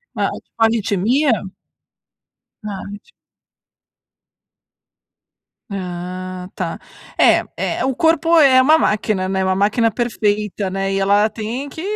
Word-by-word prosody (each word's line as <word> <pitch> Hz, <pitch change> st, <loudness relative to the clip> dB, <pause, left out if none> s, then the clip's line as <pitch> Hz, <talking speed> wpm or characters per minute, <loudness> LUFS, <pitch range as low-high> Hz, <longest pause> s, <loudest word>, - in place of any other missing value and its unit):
Ah, -, -, 0 dB
é -, -, -7 dB
tipo -, -, -37 dB
arritmia? 225 Hz, +5 st, +2 dB, 1.3 s
Arrit 200 Hz, 0 st, -7 dB, 2.7 s
Ah 185 Hz, -1 st, -6 dB
tá. 175 Hz, -3 st, -4 dB, 0.4 s
É -, -, +5 dB, 0.2 s
é -, -, -2 dB
é, -, -, 0 dB
o 265 Hz, -2 st, -1 dB
corpo 330 Hz, +1 st, +3 dB
é 265 Hz, -4 st, +6 dB
uma 310 Hz, +5 st, +5 dB
máquina, 205 Hz, -6 st, 0 dB
né, 190 Hz, 0 st, 0 dB
uma 190 Hz, -, +1 dB
máquina 215 Hz, +4 st, +2 dB
perfeita, 210 Hz, -3 st, -1 dB
né, 195 Hz, +1 st, -2 dB
e 195 Hz, -, 0 dB
ela 205 Hz, +2 st, +3 dB
tem 230 Hz, +6 st, -5 dB
que, 320 Hz, -, -8 dB
210 Hz, 120 wpm, -19 LUFS, 190-245 Hz, 2.7 s, é